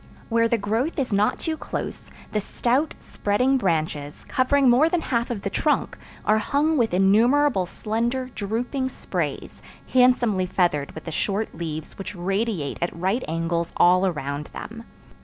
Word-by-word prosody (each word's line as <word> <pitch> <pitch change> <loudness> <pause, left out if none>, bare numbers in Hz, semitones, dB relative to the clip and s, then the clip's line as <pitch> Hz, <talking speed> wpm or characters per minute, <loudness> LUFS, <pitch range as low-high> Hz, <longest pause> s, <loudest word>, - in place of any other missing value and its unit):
Where 230 0 +3
the 235 - +1
growth 225 +9 -1
is 260 -6 -1
not 205 +1 +2
too 320 -1 -2
close, - - -6 0.2
the 210 - 0
stout, 255 +9 0
spreading 250 +7 0
branches, 155 - -2
covering 270 +1 +3
more 255 +7 +5
than 345 0 0
half 235 -6 -1
of 225 -5 -4
the 200 - -2
trunk, 300 - 0 0.3
are 215 +1 +4
hung 295 +7 +1
with 235 -6 +2
innumerable 215 +3 +4
slender, 235 +6 -2
drooping 245 +6 -2
sprays, - - -4 0.3
handsomely 245 -7 +4
feathered 170 -6 0
with 160 - -8
the 165 - -6
short 200 +6 -1
leaves 160 0 -6
which 195 +1 -6
radiate 195 -3 -2
at 170 - -1
right 195 +8 0
angles 165 +1 -1
all 185 +2 +5
around 145 -3 -3
them. 230 +1 -8
215 Hz, 155 wpm, -24 LUFS, 180-255 Hz, 0.3 s, more